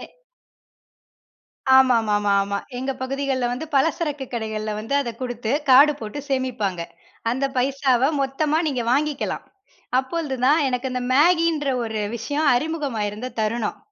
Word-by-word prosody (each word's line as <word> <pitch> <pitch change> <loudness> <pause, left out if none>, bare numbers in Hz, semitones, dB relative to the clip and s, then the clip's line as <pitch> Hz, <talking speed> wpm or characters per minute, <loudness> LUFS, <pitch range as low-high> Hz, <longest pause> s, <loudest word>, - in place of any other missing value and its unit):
எ - - -8 1.7
ஆமாமாமாமா. 205 -6 +3 0.2
எங்க 265 +2 -2
பகுதிகள்ல 265 -1 -1
வந்து 255 +6 -4
பலசரக்கு 295 -1 0
கடைகள்ல 220 -2 -3
வந்து 225 +6 -4
அத 240 - -4
குடுத்து 240 -2 -3 0.2
கார்டு 285 +4 +7
போட்டு 220 +6 -6
சேமிப்பாங்க. 235 -9 -1 0.5
அந்த 260 +4 0
பைசாவ 265 0 +2
மொத்தமா 290 +3 0
நீங்க 260 -5 -1
வாங்கிக்கலாம். 290 +2 -1 0.5
அப்பொழுதுதான் 275 0 +1
எனக்கு 255 0 -2
அந்த 250 0 -2
மேகின்ற 325 0 +3 0.2
ஒரு 220 -1 -3 0.2
விஷயம் 290 +7 -1
அறிமுகமாயிருந்த 250 -7 -2
தருணம். 220 0 -1
260 Hz, 110 wpm, -23 LUFS, 225-285 Hz, 1.7 s, கார்டு